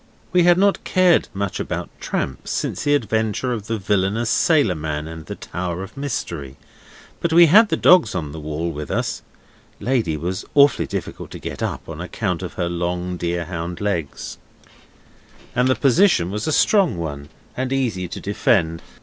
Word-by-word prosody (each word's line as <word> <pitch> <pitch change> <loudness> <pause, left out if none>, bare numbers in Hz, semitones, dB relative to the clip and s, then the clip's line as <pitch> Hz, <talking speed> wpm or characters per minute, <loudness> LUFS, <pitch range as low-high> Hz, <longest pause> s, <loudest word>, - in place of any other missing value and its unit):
We 180 - +5
had 175 0 +6
not 200 +1 +2
cared 185 -2 +3
much 100 -1 -3
about - - -4
tramps 65 -1 -3
since - - -2
the 145 0 +4
adventure 110 0 0
of 110 -3 -5
the 115 - -1
villainous 105 +3 0
sailor 145 - +3
man 75 -1 -4
and 80 -1 -9
the - - -5
Tower 90 0 -4
of 95 - -11
Mystery, 85 - -4 0.6
but 170 - -1
we 170 +1 +8
had 205 +7 +6
the - - +1
dogs 180 - +5
on 75 -5 -3
the 80 - -7
wall 80 +3 -3
with 75 -1 -6
us - - -2 0.6
(Lady 115 -11 0
was 90 +4 -3
awfully 140 -2 +5
difficult - - -5
to - - -8
get - - -7
up, - - -3
on 80 0 -7
account 90 -1 -2
of 90 - -6
her 85 - -2
long 90 +1 -2
deer 85 0 -2
hound 85 0 -5
legs), 85 -8 -3 1.2
and 125 +1 +3
the 130 - +3
position 135 - +3
was 105 +5 -3
a - - +1
strong 190 - +3
one, 75 -3 -5 0.3
and 130 0 -2
easy 115 -10 -1
to - - -7
defend. 85 -5 +1
95 Hz, 175 wpm, -21 LUFS, 85-130 Hz, 1.2 s, we